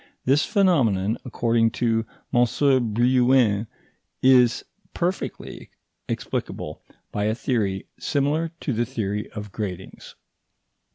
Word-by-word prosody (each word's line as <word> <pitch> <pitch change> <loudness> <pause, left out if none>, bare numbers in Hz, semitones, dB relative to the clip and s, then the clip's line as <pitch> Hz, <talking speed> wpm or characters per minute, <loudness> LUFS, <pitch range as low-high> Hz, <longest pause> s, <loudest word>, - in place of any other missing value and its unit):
This 140 +4 +4
phenomenon, 115 - +2
according 115 -2 +1
to 115 -2 0 0.3
M. 120 0 +5 0.5
Brillouin, 120 -2 +3 0.6
is 125 -2 +5 0.3
perfectly 180 +2 -4 0.4
explicable - - -4 0.3
by 105 0 -1
a 110 +1 +1
theory 105 -6 -1
similar 150 +3 0
to 135 - -1
the 120 +1 0
theory 105 -2 -3
of 105 -2 -7
gratings. 95 -3 -7
115 Hz, 100 wpm, -24 LUFS, 105-130 Hz, 0.6 s, M